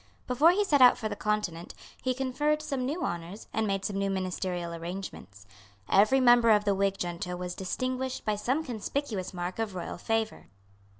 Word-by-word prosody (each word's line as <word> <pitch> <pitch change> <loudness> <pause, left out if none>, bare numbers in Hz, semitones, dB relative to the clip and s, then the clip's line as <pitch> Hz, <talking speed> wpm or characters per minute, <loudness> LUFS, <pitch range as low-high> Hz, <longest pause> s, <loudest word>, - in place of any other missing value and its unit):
Before 265 +6 +4
he 390 +4 +3
set 290 -7 +3
out 250 -1 +8
for 220 - -3
the - - -4
Continent, 210 -6 -2 0.3
he 255 -1 0
conferred 295 +4 0
some 270 -4 -2
new 320 +5 -2
honours, 175 +4 -5
and 220 0 0
made 195 -1 -1
some 200 - -2
new 200 0 0
ministerial 185 -2 -2
arrangements. 165 - -7 0.4
Every 215 +7 +5
member 240 -2 +6
of 210 -1 +5
the 200 - +3
Whig 195 0 +1
junto 175 0 -3
was 180 0 -4
distinguished 255 +8 -3
by 215 -1 +1
some 260 +9 0
conspicuous 230 - -3
mark 180 +2 -5
of 215 -4 -2
royal 175 -1 -5
favour. 225 +1 -2
210 Hz, 180 wpm, -29 LUFS, 180-255 Hz, 0.4 s, out